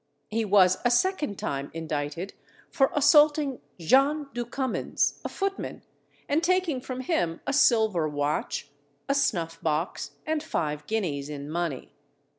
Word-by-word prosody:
He 225 +1 0
was 185 -2 +5
a 245 - +4
second 295 - +1
time 140 0 -3
indicted 160 +3 -4 0.4
for 270 -4 +3
assaulting 295 -2 +4 0.2
John 275 - +3
du 240 0 -3
Cummins, 260 0 -1
a - - -3
footman, 390 0 -4 0.4
and 295 +3 +2
taking 350 -6 +1
from 255 0 -5
him 250 - -1
a 275 - -1
silver 220 - +3
watch, 145 0 -2 0.4
a 275 - +2
snuff 170 -12 0
box, 160 +2 -2
and 315 -1 0
five 150 - -3
guineas 155 -10 -2
in 145 0 -6
money. 165 -5 -3
220 Hz, 135 wpm, -27 LUFS, -, 0.4 s, was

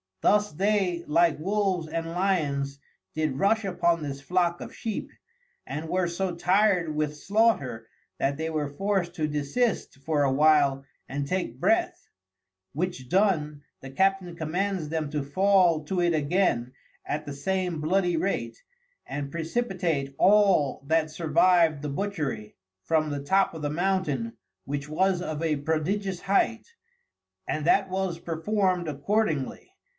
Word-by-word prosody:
Thus 210 0 +3
they, 190 0 0
like 165 0 +3
Wolves 190 -1 0
and 165 +1 -3
Lyons, 145 -7 0 0.4
did 155 -4 -1
rush 220 +2 +2
upon 170 -3 +1
this 140 -2 -5
flock 175 +2 0
of - - -8
Sheep, 225 -4 -4 0.6
and 160 +2 -5
were 185 0 +1
so 175 +1 -2
tired 180 -2 +2
with 150 0 -1
slaughter, 180 - +1 0.3
that 140 +1 0
they 160 +1 -2
were 150 -3 -2
forced 180 +2 -1
to 155 -3 0
desist 150 - -1
for 150 -2 +1
a 135 - +2
while 140 -1 +3 0.2
and 140 +1 -2
take 175 -8 -2
breath, - - +1 0.7
which 155 -5 -3
done, 155 -7 +1 0.2
the 135 - -8
Captain 190 +3 +1
commands 175 +1 -2
them 155 -2 -2
to 150 -1 -2
fall 180 +1 +3
to 180 +3 -1
it 175 -1 +2
again 145 -6 +1 0.3
at 150 +1 -3
the 145 - -5
same 180 +3 -2
bloody 175 +2 +1
rate, 195 - -2 0.4
and 140 0 -4
precipitate 165 - -2
all 195 -10 +4
that 160 0 +2
survived 165 0 +3
the 150 - -3
Butchery, 140 - -3 0.3
from 155 +3 +1
the 145 -1 -4
top 190 +6 +2
of 160 - -7
the 145 - 0
Mountain, 190 +7 -1 0.3
which 145 +1 -4
was 185 +3 +1
of 155 -2 -4
a 155 -2 +1
prodigious 175 +6 -1
height; 225 - +1 0.8
and 155 -1 -2
that 190 +3 +3
was 185 -2 -2
perform'd 180 +1 0
accordingly. 155 0 -1
165 Hz, 140 wpm, -27 LUFS, 150-190 Hz, 0.8 s, all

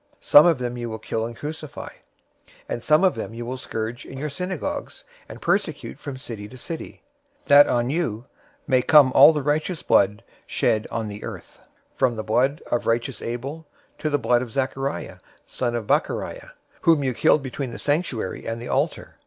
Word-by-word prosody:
Some 150 +3 +7
of 165 -4 +4
them 125 -1 -4
you 120 -1 -4
will 110 - -5
kill 110 +1 -3
and 115 -1 -10
crucify; 155 0 -7 0.8
and 120 - -4
some 155 +8 +3
of 190 - +4
them 115 - -6
you 120 0 -5
will 125 +2 -4
scourge 115 -1 -5
in 135 - -10
your 150 +2 -4
synagogues, 180 +1 -4 0.3
and - - -9
persecute - - -1
from 140 -2 -6
city 115 -6 -7
to 130 - -12
city; 160 +6 -8 0.4
023:035 - - -35
that 145 0 +8
on 120 0 +1
you 135 -8 -2 0.4
may 130 -3 +3
come 140 -1 +6
all 145 +4 +9
the 150 -3 -2
righteous 155 +4 -1
blood 100 +1 +3 0.2
shed 110 0 +1
on 115 -1 -3
the 105 0 -8
earth, - - -9 0.4
from 130 -3 +2
the 110 - -4
blood 130 +7 +1
of 120 - 0
righteous 115 +1 -1
Abel 135 +7 -5 0.3
to 155 - -1
the 145 - +2
blood 120 -3 +2
of 125 -3 -6
Zachariah 135 +2 -3 0.3
son 120 -2 -2
of 115 -2 -3
Barachiah, - - -1 0.3
whom 160 -4 +4
you 130 -2 0
killed 140 +4 +3
between 130 0 -4
the 115 - -7
sanctuary 145 - -2
and 115 0 -3
the 120 - -7
altar. - - -2
130 Hz, 190 wpm, -23 LUFS, 115-145 Hz, 0.8 s, all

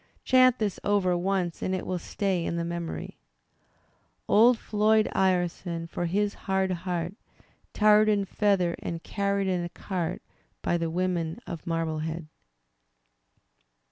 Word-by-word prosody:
Chant 255 -1 +5
this 210 -5 -2
over 200 -3 +2
once 180 -1 -1
audit 185 -1 -2
will 180 -1 -2
stay 190 0 -1
in 170 - -2
the 170 0 -1
memory: 170 -1 -5 1.1
Old 235 +3 +6
Floyd 215 0 +2
Ireson, 175 -2 0
for 170 +1 -3
his 205 +3 0 0.2
hard 190 0 +2
heart. 175 0 -3 0.6
Tarred 215 0 +5
and 200 -2 +1
feathered 185 -4 +1
and 165 -1 -5
carried 200 -1 -1
in 180 -2 0
a 175 - -4
cart 180 -2 -4 0.4
By 175 - +1
the 165 -1 -1
women 170 -2 -1
of 165 -1 -7
Marblehead. 160 0 -2
185 Hz, 130 wpm, -27 LUFS, 170-200 Hz, 1.1 s, Old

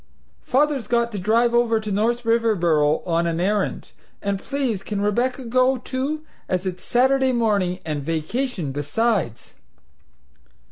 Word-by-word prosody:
Father's 280 -2 +1
got 235 -1 +1
to 205 - -4
drive 230 +5 +2
over 235 -2 +3
to 215 -1 -5
North 230 +4 0
Riverboro 175 -10 +2
on 170 -1 +1
an 165 0 -1
errand, 200 +2 -1 0.3
and 200 -1 -2
please 260 -5 -2
can 205 +1 -4
Rebecca 245 +6 0
go, 255 +2 +2
too, 270 +5 -3 0.2
as 185 0 -1
it's 180 -1 -4
Saturday 265 +2 +3
morning 205 -6 +1
and 150 -2 -2
vacation 165 - -2
besides?" 145 - -1
220 Hz, 135 wpm, -22 LUFS, 180-245 Hz, 0.3 s, over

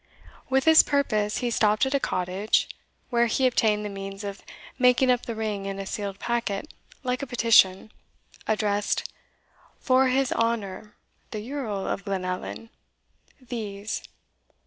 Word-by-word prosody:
] - - -23
With 265 0 +2
this 320 0 +9
purpose 215 -8 0
he 240 - 0
stopped 215 +1 +3
at 265 - -2
a 280 - +3
cottage, 185 0 0 0.4
where 235 0 +3
he 260 +3 +1
obtained 215 -4 +2
the - - -1
means 195 0 -7
of 200 -1 -6 0.4
making 250 0 +5
up 245 -1 0
the 230 - -3
ring 210 -3 -3
in 195 0 -4
a 195 - -5
sealed 200 0 -4
packet 235 +2 -2 0.3
like 250 0 -1
a 275 - -4
petition, 225 -5 +4 0.6
addressed, 210 -1 0 0.7
Forr 260 0 +3
his 260 0 +1
hounor 215 -3 -2 0.3
the 215 0 -6
Yerl 235 -8 -3
of 195 - -3
Glenllan 190 +3 -4 0.7
These. 220 -4 -5
220 Hz, 145 wpm, -26 LUFS, 200-250 Hz, 0.7 s, this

